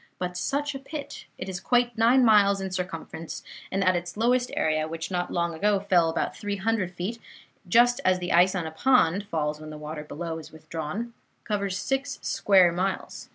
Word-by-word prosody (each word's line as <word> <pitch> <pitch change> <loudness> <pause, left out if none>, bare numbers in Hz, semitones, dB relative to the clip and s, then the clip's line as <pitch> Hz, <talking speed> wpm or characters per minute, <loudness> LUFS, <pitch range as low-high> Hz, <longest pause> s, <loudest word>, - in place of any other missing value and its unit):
But 180 0 -4
such 290 +8 -1
a 270 - -6
pit! 285 +1 -8
It 185 - -6
is 185 -1 -4
quite 245 +1 +2
nine 240 +3 +5
miles 200 -3 +5
in 190 -1 -4
circumference, 165 -3 -5 0.3
and 195 +1 0
at 185 -1 +3
its 175 +1 -4
lowest 245 +2 +2
area 155 0 +1
which 165 +2 -5
not 180 -1 -1
long 170 -1 -1
ago 200 +5 +2
fell 180 -4 +3
about 165 - -2
three 205 -1 -3
hundred 195 -3 -1
feet, 215 +7 -4 0.5
just 240 +6 +4
as 185 0 +3
the 180 -1 -2
ice 180 +3 +5
on 175 -3 -2
a 160 - -5
pond 200 -1 +3
falls 150 -4 -2
when 155 - -8
the 155 - -8
water 150 0 -6
below 160 +2 -5
is 155 - -12
withdrawn 160 +8 -5 0.3
covers 200 -3 -1
six 270 +7 -2
square 190 -4 +4
miles. 185 +3 -3
185 Hz, 195 wpm, -26 LUFS, 165-225 Hz, 0.5 s, nine